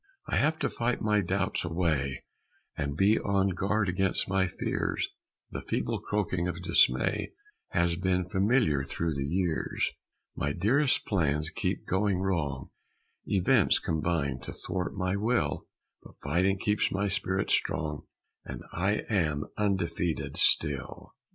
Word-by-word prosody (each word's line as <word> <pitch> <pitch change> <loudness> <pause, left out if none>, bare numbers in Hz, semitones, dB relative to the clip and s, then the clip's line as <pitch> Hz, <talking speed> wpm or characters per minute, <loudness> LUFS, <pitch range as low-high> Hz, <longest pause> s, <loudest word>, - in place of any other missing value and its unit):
I - - -1
have 155 +2 +2
to - - 0
fight 120 +1 -1
my 105 -1 +2
doubts 90 - -1
away, 80 -6 -1 0.5
And 70 +1 -3
be 100 +5 +4
on 100 -1 +1
guard 100 +3 0
against 95 +1 0
my 95 0 +2
fears; - - -2 0.4
The - - -4
feeble - - -2
croaking 95 -4 -1
of 90 0 -4
Dismay 65 -6 +3 0.3
Has 85 0 +1
been 90 -1 0
familiar 95 - +2
through 80 +3 -2
the 70 -1 -2
years; 85 0 0 0.4
My 70 0 -1
dearest 130 - +2
plans 75 -5 0
keep - - -2
going 95 0 +1
wrong, 80 -8 -2 0.6
Events 95 -3 +4
combine 80 -4 -1
to - - -8
thwart 90 +1 -4
my 95 0 0
will, 100 - 0 0.3
But - - -16
fighting 90 +7 +2
keeps 105 +2 +1
my 100 +1 0
spirit 95 -1 0
strong, 75 -1 0 0.4
And - - -7
I 95 +5 0
am 80 -9 0
undefeated 85 -5 -1
still! 75 -4 +1
90 Hz, 135 wpm, -29 LUFS, 80-100 Hz, 0.6 s, be